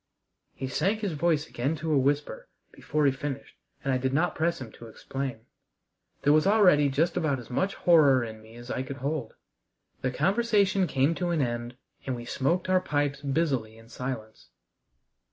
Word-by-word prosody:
He 130 - -4
sank 200 +11 0
his 205 -4 -1
voice 155 0 +1
again 135 +7 -2
to 155 0 -2
a - - +4
whisper 145 - -1 0.2
before 150 -1 -1
he 140 - +5
finished, 140 0 -6 0.3
and 135 - 0
I 130 - +1
did 130 +1 -1
not 175 +4 +2
press 170 +2 0
him 125 -4 -8
to 115 - -12
explain. 130 +2 -5 0.8
There 145 - +5
was 155 +4 +4
already 180 -9 +5
just 160 +6 +1
about 155 -6 +1
as 125 0 -11
much 190 +10 0
horror 145 -7 +5
in 110 -1 -8
me 110 +1 -15
as 120 +1 -9
I 130 - -1
could 135 +1 -6
hold. 140 -3 -3 0.7
The 130 - 0
conversation 200 - +2
came 135 +3 +2
to 175 +1 -2
an 165 -5 +1
end, 120 0 -4 0.3
and 130 - -1
we 120 0 -8
smoked 170 +10 0
our 185 0 +3
pipes 145 -4 -1
busily 135 -7 -1
in 115 0 -17
silence. 120 -4 -6
140 Hz, 185 wpm, -27 LUFS, 130-170 Hz, 0.8 s, he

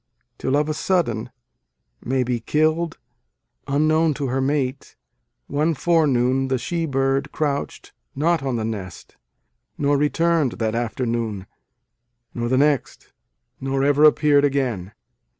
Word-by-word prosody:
Till 130 +2 +1
of 150 0 +1
a 155 - -1
sudden, 150 - 0 0.7
May 130 +1 0
be 125 -1 -1
kill 155 +7 +1
d, 165 - -15 0.7
unknown 155 +2 +2
to 140 -3 -3
her 130 +2 0
mate, 135 -1 -2 0.5
One 155 +3 0
forenoon 135 -5 +2
the 130 0 0
she 165 +6 -2
bird 135 -1 0
crouch 145 -2 -2
d - - -16 0.3
not 165 +3 +1
on 135 -2 -2
the 110 -2 -2
nest, 100 -5 -7 0.6
Nor 145 0 +2
returned 160 -2 +1
that 110 -1 -2
afternoon, 115 -3 -2 0.9
nor 120 0 -2
the 130 - +2
next, 145 0 0 0.5
Nor 135 0 -1
ever 145 +1 +3
appeared 150 -1 +5
again. 125 -10 -1
135 Hz, 135 wpm, -22 LUFS, 125-150 Hz, 0.9 s, appeared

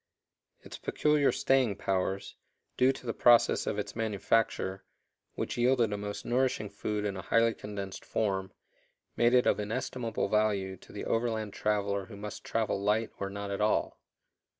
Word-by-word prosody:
Its - - -10
peculiar 150 -2 +2
"staying 130 -6 +2
powers," 95 0 -2 0.4
due 130 +1 +4
to 135 -1 -10
the 115 - -1
process 120 +1 +4
of - - -1
its 105 - -4
manufacture, 110 -3 0 0.5
which - - -3
yielded 120 -3 +3
a - - 0
most 105 0 -5
nourishing 120 -4 0
food 105 -1 -3
in 100 -1 -2
a 95 - -5
highly 115 +2 +3
condensed 100 -3 -6
form, 95 -3 -1 0.6
made 120 +1 +4
it 125 - +5
of - - +3
inestimable 115 +1 -2
value 100 -2 +1
to - - -17
the - - -6
overland 110 -3 -1
traveler 100 -2 0
who 105 -3 -10
must 105 0 -7
travel 110 -3 -1
light 105 +2 +1
or 100 - -2
not 100 0 -5
at 100 - -2
all. 105 0 +1
105 Hz, 160 wpm, -30 LUFS, 100-115 Hz, 0.6 s, it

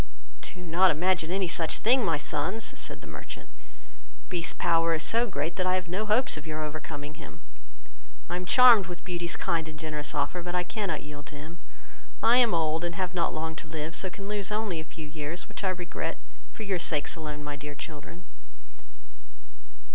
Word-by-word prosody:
"Do 180 - -8
not 180 +2 +4
imagine 170 +1 +2
any 190 0 +1
such 165 -1 +1
thing, 250 +3 +5
my 165 -6 +2
sons, 185 +9 -1
(said - - -3
the - - -10
merchant,) - - -8 0.8
Beast's 175 -2 +1
power 165 0 +3
is 155 - -1
so 230 +7 +4
great, 160 -4 -2
that 185 -1 +1
I 185 - +3
have 185 -1 -2
no 195 +5 -2
hopes 220 -2 +3
of 150 - -8
your 155 0 -2
overcoming 150 0 -6
him; - - -11 0.9
I 175 - -2
am 180 0 -4
charmed 235 -4 +8
with 175 -1 -7
Beauty's 175 -2 -2
kind 165 -1 0
and 155 - -9
generous 150 -1 -3
offer, 145 +5 0
but 175 +1 -4
I 180 - +2
cannot 190 -3 -2
yield 145 -1 -9
to 150 - -8
it; 150 +3 -8 0.7
I 235 +2 +7
am 235 -7 +6
old, 160 0 +1
and 170 -1 -2
have 185 0 -2
not 175 - +1
long 160 0 -3
to 165 - -7
live, 155 +1 -4
so 190 - +2
can 195 - -9
only 210 +1 -2
lose 200 -1 -1
a 210 -6 -1
few 160 -1 -9
years, 155 +2 -3
which - - -7
I 190 - +2
regret 180 -2 -3 0.3
for 220 - -7
your 195 -3 0
sakes 150 -3 +1
alone, 150 -2 -5
my 145 0 -4
dear 145 0 -7
children." 165 +4 -8
170 Hz, 200 wpm, -28 LUFS, 155-185 Hz, 0.9 s, charmed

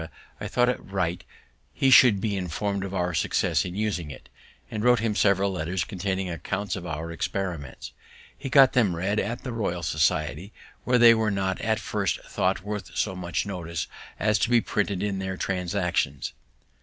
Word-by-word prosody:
I - - -4
thought 125 0 +2
it 125 - -2
right 90 -3 -2 0.5
he 135 - +3
should 125 -6 +7
be 105 0 -1
inform'd 95 +2 -2
of 100 - -5
our 90 -2 -1
success 80 - +1
in 90 0 -5
using 100 -7 -2
it, 70 - -11 0.4
and 110 -1 -3
wrote 125 0 +5
him 110 -1 -1
several 100 -1 +3
letters 90 0 -2
containing 95 0 -3
accounts 90 +3 -3
of 90 -1 -6
our 80 +1 -4
experiments. 85 -4 -4 0.4
He 135 - -6
got 135 -1 +6
them 105 -8 +3
read 100 +5 0
in 115 +4 -2
the 125 - -4
Royal 90 -7 -2
Society, 75 +3 0 0.3
where 125 0 +3
they 120 -1 +8
were 110 -1 +1
not 95 -2 -1
at 110 -1 0
first 105 -3 -1
thought - - -1
worth 105 0 -6
so 95 -3 0
much 85 -1 -2
notice 85 -4 -4 0.3
as 105 0 +2
to - - +1
be 120 -1 +5
printed 100 -3 -1
in 100 -2 -1
their 95 0 -3
Transactions. 90 -7 -1
95 Hz, 180 wpm, -26 LUFS, 90-105 Hz, 0.5 s, they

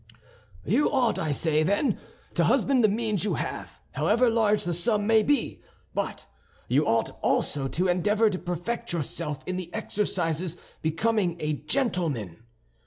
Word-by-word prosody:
"You 240 - +3
ought, 250 -5 +2
I 155 - -1
say, 155 +2 +2
then, 200 - +1 0.3
to - - +2
husband 265 -4 +3
the - - +7
means 215 -2 -1
you 210 - 0
have, - - -5
however 235 +2 +2
large 215 -2 +2
the 175 - -1
sum 205 +4 +1
may 220 0 +5
be; 290 +5 0 0.3
but - - -3 0.4
you - - +2
ought - - +1
also 135 -2 +1
to 180 +7 0
endeavor 205 +5 +2
to 185 - -3
perfect 175 +5 -3
yourself 150 -2 -2
in 185 0 -3
the 180 -2 -6
exercises 175 -4 -1 0.2
becoming 175 +2 0
a 150 -1 -1
gentleman. 150 - -1
185 Hz, 150 wpm, -26 LUFS, 165-225 Hz, 0.4 s, the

